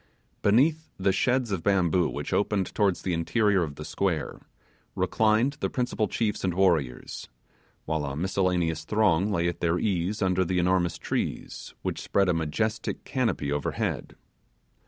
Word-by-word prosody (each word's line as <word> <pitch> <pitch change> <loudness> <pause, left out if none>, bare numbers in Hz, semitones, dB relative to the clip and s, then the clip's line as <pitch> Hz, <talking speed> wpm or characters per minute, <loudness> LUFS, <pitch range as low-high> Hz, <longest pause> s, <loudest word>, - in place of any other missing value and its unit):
Beneath 150 +10 +3
the 95 0 +2
sheds 125 +4 +1
of 95 -4 -1
bamboo 90 -3 +2
which - - -4
opened 100 -2 0
towards 100 -4 +1
the 90 - -1
interior 100 +4 +2
of 75 -4 -3
the 75 - -8
square 85 -7 -2 0.6
reclined 110 +6 +2
the - - -1
principal 120 -4 -1
chiefs 105 0 -1
and 90 -2 0
warriors, 85 -10 0 0.6
while 80 -1 -1
a 70 -1 -4
miscellaneous 90 -2 0
throng 105 0 +2
lay 85 -2 +1
at 85 - -3
their 85 0 +1
ease 95 +1 -1
under 95 0 +2
the 90 +1 -1
enormous 90 0 +2
trees - - -4
which - - -3
spread 100 -2 +1
a - - +3
majestic 85 +8 -2
canopy 115 - -1
overhead. 75 -1 -2
95 Hz, 150 wpm, -27 LUFS, 85-105 Hz, 0.6 s, Beneath